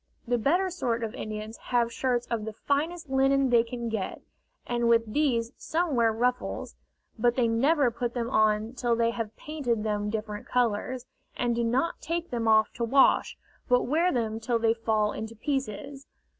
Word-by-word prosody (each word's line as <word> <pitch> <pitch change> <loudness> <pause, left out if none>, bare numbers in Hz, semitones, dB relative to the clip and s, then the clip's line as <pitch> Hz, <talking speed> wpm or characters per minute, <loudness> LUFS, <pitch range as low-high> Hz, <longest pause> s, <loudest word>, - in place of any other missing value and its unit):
The 245 0 +1
better 355 - +2
sort 240 -9 -1
of 220 - -3
Indians 215 +1 -6
have 235 -1 +1
shirts 245 -1 0
of 225 -2 -1
the 220 - -5
finest 315 +7 -1
linen 270 0 +3
they 235 -1 +6
can 235 0 -5
get, 220 -4 -3 0.5
and 240 -1 0
with 230 0 +4
these 240 -6 +1
some 330 -1 -1
wear 230 -2 +4
ruffles, 250 +3 -2 0.4
but 240 +1 +3
they 245 -3 +2
never 265 +3 +3
put 240 +1 -3
them 235 -1 -1
on 215 -1 +2
till 240 -2 0
they 230 0 +2
have 225 -2 -5
painted 255 -8 -2
them 210 -1 -1
different 210 -1 -4
colors, 245 +1 0 0.3
and 240 -1 +1
do 235 0 0
not 260 +9 0
take 335 +1 -3
them 230 -2 -1
off 220 -1 +4
to 235 - -3
wash, 265 +4 +3 0.3
but 250 0 +4
wear 330 +7 +2
them 225 -3 -1
till 235 +1 0
they 225 -1 +3
fall 220 -2 0
into 220 +1 -6
pieces. 270 +1 -4
235 Hz, 180 wpm, -27 LUFS, 225-265 Hz, 0.5 s, they